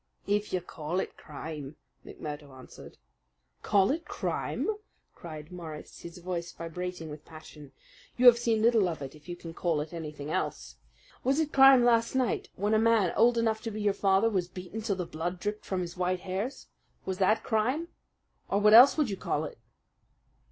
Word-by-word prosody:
"If 205 +1 0
you 185 - 0
call 170 +1 -4
it - - -4
crime," 150 -1 -8 0.3
McMurdo 150 -1 -8
answered. 130 - -13 0.6
"Call 200 0 +3
it 325 +4 -2
crime!" - - -3 0.5
cried 155 -2 -10
Morris, 160 -4 -9
his 170 +1 -10
voice 175 -1 -4
vibrating 170 -1 -6
with 150 0 -9
passion. 155 -3 -13 0.5
"You 250 - +2
have 240 -1 +9
seen 225 -2 +1
little 225 -5 +4
of 160 -4 -5
it 135 - -7
if 155 +3 -16
you 175 - -4
can 165 -1 -9
call 165 -2 0
it 155 +3 -5
anything 150 -3 -6
else. - - -3 0.5
Was 270 +4 +2
it 310 -2 -1
crime 270 -2 +8
last 230 0 +3
night 255 -2 0
when 205 +3 0
a 215 - +4
man 225 -5 +3
old 235 +2 +4
enough 220 -1 +1
to 230 - -4
be 215 0 -6
your 205 -1 +2
father 195 +2 +3
was 190 -6 0
beaten 185 +4 -7
till 210 -2 -1
the 180 -1 -3
blood 175 +3 -4
dripped 210 +3 -4
from 190 -1 -2
his 175 -1 -5
white 180 0 -1
hairs? 195 +8 -4 0.4
Was 190 0 -3
that 215 +4 +3
crime 255 +9 0 0.6
or 200 - +2
what 210 +1 +5
else 255 +6 +9
would 290 -8 +1
you 195 - -3
call 150 - -2
it?" 150 - -9
185 Hz, 185 wpm, -29 LUFS, 165-225 Hz, 0.6 s, have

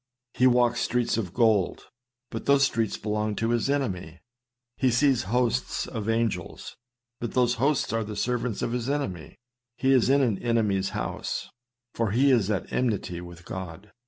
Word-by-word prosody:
He 125 +1 +4
walks 120 -1 +3
streets 125 -1 +1
of 100 -7 -2
gold, 110 -3 +2 0.5
but 115 - -6
those 140 0 +5
streets 115 -5 0
belong 105 0 -2
to 115 +2 0
his 120 +2 +1
enemy. 95 - -2 0.6
He 130 - +2
sees 125 -2 +2
hosts 125 +1 0
of 110 -3 -4
angels; 115 -6 -2 0.4
but 120 - -4
those 125 -1 +3
hosts 140 -5 +1
are 115 0 0
the 105 0 -6
servants 120 0 -1
of 120 - -1
his 125 +1 -2
enemy. 100 - -3 0.4
He 135 - +2
is 130 -2 +4
in 140 +1 +4
an 110 -6 +1
enemy's 105 -5 +1
house: - - -4 0.4
for 115 -2 0
he 130 +7 +3
is 110 -6 +3
at 105 -3 -2
enmity 105 -8 -1
with 85 0 -11
God. 95 +2 -7
115 Hz, 165 wpm, -26 LUFS, 105-125 Hz, 0.6 s, those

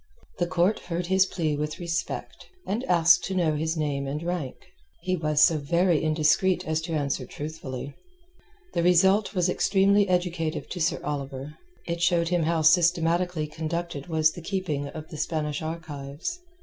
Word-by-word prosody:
The 175 - +1
court 185 +4 +2
heard 175 0 -4
his 190 +1 +3
plea 160 -5 -1
with 150 +1 -3
respect, 170 0 -4 0.2
and 220 +6 -2
asked 170 -2 +5
to 190 - -3
know 170 -4 +2
his 160 +2 -1
name 140 -3 -1
and 150 +4 -4
rank. 170 -7 -3 0.5
He 185 +1 0
was 155 -3 +2
so 160 -2 +4
very 170 +3 +2
indiscreet 155 +4 +2
as 160 0 0
to 165 0 -5
answer 140 -3 -1
truthfully. 140 -1 -7 0.8
The - - +1
result 190 +4 +4
was 180 -1 +2
extremely 195 +2 +3
educative 175 -3 -1
to 180 - -5
Sir 160 - +1
Oliver; 140 0 -5 0.3
it 170 0 -3
showed 175 -1 +2
him 175 -1 +1
how 160 0 +1
systematically 170 0 +3
conducted 160 -1 -4
was 160 -2 +3
the 175 - -9
keeping 165 -6 -2
of 155 +2 -8
the 155 - -8
Spanish 150 -1 -2
archives. 160 - -5
165 Hz, 160 wpm, -26 LUFS, 150-180 Hz, 0.8 s, asked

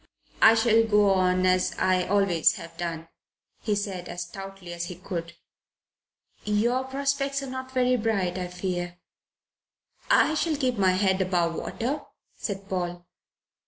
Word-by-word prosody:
"I 220 +1 +8
shall 225 0 +4
go 210 -2 +4
on 185 -1 +2
as 185 0 +2
I 185 -1 +2
always 195 -5 +3
have 165 0 -10
done," 165 -1 -4 0.5
he 210 -3 0
said 195 -3 -4
as 175 - -4
stoutly 195 -1 -9
as 170 0 -4
he 180 - -7
could. 170 -1 -6 1.1
"Your 235 +5 +1
prospects 275 +1 -1
are 270 - -6
not 260 0 -6
very 255 -1 +2
bright, 200 -6 0
I 180 -1 -3
fear." 175 -1 -4 1.1
"I 315 - +5
shall 315 0 0
keep 255 -5 -1
my 185 -1 +4
head 190 0 +2
above 175 -2 +1
water," 255 - -3 0.3
said 195 -2 -5
Paul. 175 -2 -3
195 Hz, 145 wpm, -26 LUFS, 180-230 Hz, 1.1 s, I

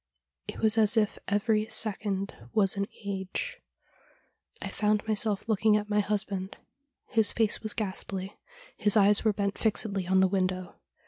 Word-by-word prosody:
It - - -6
was 220 0 +4
as 215 +1 +4
if 210 -2 +1
every 215 +1 +1
second 200 -3 -1 0.2
was 195 -2 +3
an 200 0 -2 0.2
age. 190 -2 -4 1.0
I - - -5
found 210 0 0
myself 215 -1 0
looking 215 -1 +3
at 210 0 -5
my 210 - +3
husband. 200 -2 -2 0.5
His 220 -3 +2
face 225 -2 +1
was 215 -1 -1
ghastly: 195 -2 -4 0.4
his 210 +1 +3
eyes 205 0 +5
were 220 - +3
bent 200 -1 -2
fixedly 200 -4 0
on 190 +1 +3
the 190 - +5
window. 185 -1 -1
205 Hz, 150 wpm, -28 LUFS, 195-215 Hz, 1.0 s, eyes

